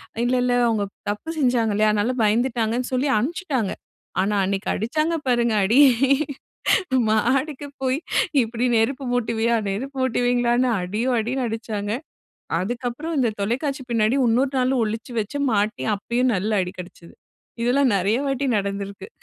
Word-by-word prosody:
அ - - -17
இல்ல 250 +1 +2
இல்ல 250 0 +1
அவுங்க 220 -3 +1 0.3
தப்பு 210 +10 -6
செஞ்சாங்க 245 -5 +2
இல்லயா! 215 +1 +3
அதனால 215 +5 0
பயந்துட்டாங்கன்னு 230 +2 +1
சொல்லி" 260 +3 +1
அம்ன்ப்பிச்சுட்டாங்க. 265 - -1 0.5
ஆனா, 200 +2 0
அன்னக்கி 195 +2 -2
அடிச்சாங்க 305 - 0
பாருங்க! 235 -2 +2
அடி. 230 +8 +4 1.3
"மாடிக்கு 265 +6 0 0.2
போயி 260 +2 +1 0.4
இப்பிடி 235 +2 -1
நெருப்பு 260 +4 0
மூட்டுவீயா!" 235 -1 +1
நெருப்பு 265 +8 -4
மூட்டுவீங்களான்னு 245 0 +2
அடியோ! 210 +8 -2
அடின்னு 250 +4 -1
அடிச்சாங்க. 220 -2 -4 0.7
அதுக்கு 240 +6 -3
அப்புறம் 315 +7 -5
இந்த 245 -4 +2
தொலைக்காட்சி 270 +6 -2
பின்னாடி 230 +2 +2
உன்னொரு 255 +4 +2
நாளும் 255 -1 +2
ஒழிச்சு 220 +3 -5
வச்சு, 215 +7 -4
மாட்டி 210 +2 0
அப்பயும் 240 +5 0
நல்ல 200 +4 -2
அடி 180 0 -5
கிடச்சது. 175 -1 -12 0.5
இதெல்லாம் 255 +2 +3
நிறைய 195 +4 +1
வாட்டி 275 0 -1
நடந்திருக்கிறது. 200 - -4
235 Hz, 135 wpm, -23 LUFS, 215-255 Hz, 1.3 s, அடி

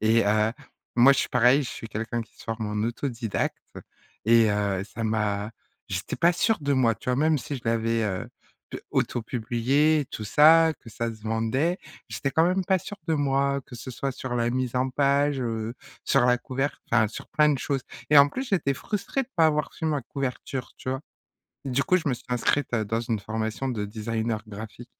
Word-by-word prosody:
et, 110 0 +3
heu, 105 +1 +2 0.4
moi 125 +3 +8
je - - 0
suis - - -2
pareil, 125 +4 +5
je - - -5
suis 115 - -8
quelqu'un 115 +2 -3
qui 110 - -20
se - - -13
forme 115 -1 -3
en 105 +1 -1
autodidacte 120 -3 -3 0.6
et, 115 -1 +6
heu, 100 -2 0
ça 115 +2 -7
m'a 105 -1 -1 0.4
j'étais - - -3
pas 170 +1 +4
sûr 220 +5 +1
de 145 -1 0
moi, 125 -4 +3
tu 105 - -10
vois? 125 - +1
Même 155 +2 +3
si 140 +1 -5
je 120 - -10
l'avais, 115 0 +1
heu, 95 -3 -3 0.4
d - - -5
auto-publié, 125 +6 +1
tout 110 - -5
ça, 160 +7 +6
que - - -13
ça 115 +2 -3
se 110 - -18
vendait, 115 - 0 0.3
j'étais 135 - -2
quand 160 - +3
même 185 +2 +1
pas 190 +1 +3
sûr 200 +3 -8
de 160 - +3
moi, 140 -1 +1
que 125 - -11
ce 120 - -7
soit 135 +2 -3
sur 130 -1 -5
la 120 -1 +1
mise 125 0 -2
en 130 +1 +1
page, 140 +1 +2
heu, 115 -1 -3 0.3
sur - - +3
la 125 0 +4
couver 135 +3 -1 0.2
enfin 115 -2 +4
sur 110 - -9
plein 150 -1 +3
de 140 - 0
choses 135 0 -2 0.3
et 150 - +8
en 140 - +8
plus 260 - -5
j'étais 155 -8 +1
frustré 210 - -2
de 255 - -11
pas 160 - +6
avoir 150 -1 0
fait 160 - -3
ma 150 -3 0
couverture, 130 0 -4
tu 130 - -5
vois? 130 0 -2 0.7
Du 135 +1 +1
coup 185 - +3
je 165 - -3
me - - +1
suis - - -16
inscrite 125 +2 0
à 110 -2 +2
dans 115 +3 -1
une 115 -2 -2
formation 110 +4 -3
de 110 -5 -2
designer 110 +1 -3
graphique. 110 +3 -9
125 Hz, 210 wpm, -26 LUFS, 110-145 Hz, 0.7 s, moi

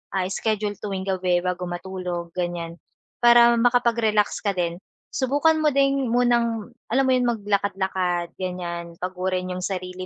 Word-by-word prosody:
ah, 185 -1 0
schedule 210 0 -1
tuwing 195 -2 -4
gabi 185 -2 +1
bago 180 0 -2
matulog 175 -1 -5
ganyan 175 -1 -3 0.4
para 240 0 +7
makapag-relax 235 -3 +2
ka 200 - +2
din. 170 -1 -1 0.3
Subukan 285 +4 +2
mo 300 - +4
ding 275 -3 +2
munang 235 -2 +1 0.2
alam 265 +2 +3
mo 260 - +3
'yon 250 -1 +1
maglakad-lakad 190 -5 -1
ganyan 175 -2 -5
pagurin 185 0 -2
yung 180 0 -4
sarili 185 -1 -4
190 Hz, 135 wpm, -24 LUFS, 180-235 Hz, 0.4 s, para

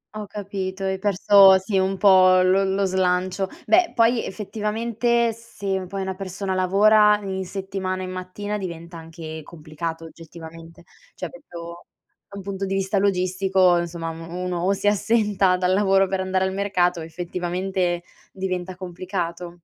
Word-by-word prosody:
Ho 210 -1 -6
capito, 195 -2 -5
hai 190 0 -1
perso 195 -1 +6
sì 190 +1 -1
un 190 0 0
po' 185 -1 +6
lo 190 +2 +3
lo 195 +1 0
slancio. 185 0 0 0.2
Beh, 350 0 +3
poi 230 0 +3
effettivamente, 230 +3 -1
se 200 -4 -5
poi 195 +1 -5
una 190 0 -3
persona 190 0 -4
lavora 210 +3 +5
in 190 -1 -3
settimana 190 -1 -4
e - - -4
mattina 185 +3 -5
diventa 170 -2 -7
anche 160 -1 -8
complicato 160 +1 -7
oggettivamente. 165 0 -12 0.3
Cioè, - - -6
proprio 170 - -11 0.4
da 200 - -10
un 195 - -7
punto 195 0 -4
di 195 - -2
vista 195 +1 0
logistico, 185 -1 +2
insomma, 170 -1 -4
m 165 - -10
u 175 - -6
uno 180 -1 -2
o 190 +2 +2
si 200 - -6
assenta 205 -3 +2
dal 180 0 +1
lavoro 195 -1 +3
per 190 0 -2
andare 190 0 0
al 190 - -2
mercato 185 -3 +1
o - - -6
effettivamente 175 +1 -3 0.3
diventa 185 -1 -4
complicato. 175 -1 -5
190 Hz, 155 wpm, -23 LUFS, 180-200 Hz, 0.4 s, perso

